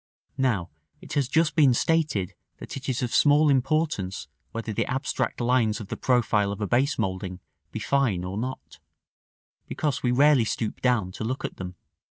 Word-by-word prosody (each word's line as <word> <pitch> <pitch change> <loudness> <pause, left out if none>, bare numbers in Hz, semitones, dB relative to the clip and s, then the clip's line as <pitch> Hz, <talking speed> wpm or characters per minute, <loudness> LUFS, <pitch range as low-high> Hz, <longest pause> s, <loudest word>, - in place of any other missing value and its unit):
Now 100 -11 0 0.3
it - - -9
has 140 -4 +1
just 160 +4 +2
been 140 -6 +5
stated 140 - +1 0.2
that - - -8
it 135 0 -5
is 130 0 -1
of 120 - -2
small 150 +1 +5
importance 135 - 0 0.2
whether 115 -1 -4
the - - -1
abstract 135 +2 -2
lines 120 -3 +2
of 105 -3 -8
the - - -3
profile 110 -5 +2
of 100 - -5
a 105 - -1
base 130 +6 +1
moulding 95 -3 -3 0.3
be - - -5
fine 125 -11 +1
or 90 +1 -4
not, 130 +3 -6 0.9
because 145 -4 -2
we 125 - +1
rarely 140 0 +5
stoop 110 0 -3
down 115 -8 +1
to 100 - -6
look 130 +4 -3
at - - -6
them. 90 -1 -6
125 Hz, 175 wpm, -26 LUFS, 105-140 Hz, 0.9 s, been